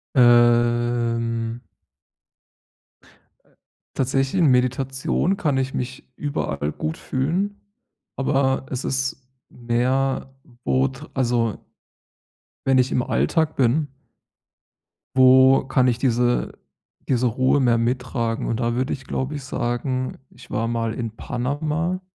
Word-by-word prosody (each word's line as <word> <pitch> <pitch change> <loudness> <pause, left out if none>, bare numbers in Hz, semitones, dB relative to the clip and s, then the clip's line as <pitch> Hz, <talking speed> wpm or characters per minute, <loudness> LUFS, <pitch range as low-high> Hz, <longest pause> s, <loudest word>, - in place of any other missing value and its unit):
Ähm. 120 -1 +3 2.4
Tatsächlich 135 +5 0
in 155 - +5
Meditation 135 +8 +1
kann 150 -8 0
ich 130 0 -1
mich 130 +1 -5
überall 75 - -2
gut 80 +2 -4
fühlen, 180 +10 -2 0.6
aber 135 -1 +1
es 130 0 -4
ist 130 0 -2 0.2
mehr 130 +3 -1 0.3
wo 130 +1 +2
tr 130 -1 -11
also 120 -4 0 1.0
wenn 135 -1 +4
ich 125 0 +2
im 125 - +2
Alltag 160 +4 0
bin 140 +4 +2 1.3
wo 130 +1 +6
kann 130 -1 +2
ich 120 -2 +1
diese 125 -1 0 0.5
diese 125 -1 +2
Ruhe 130 +4 +2
mehr 120 -3 +3
mittragen? 120 -1 -1
Und 115 - -1
da 120 -1 0
würde 130 +2 -1
ich, 135 - -10
glaube 135 +3 -3
ich, 140 - -7
sagen, 130 +1 -2
ich - - -17
war 115 +2 -1
mal 115 -1 -1
in 115 -2 -4
Panama. 150 +10 -2
130 Hz, 115 wpm, -22 LUFS, 120-135 Hz, 2.4 s, wo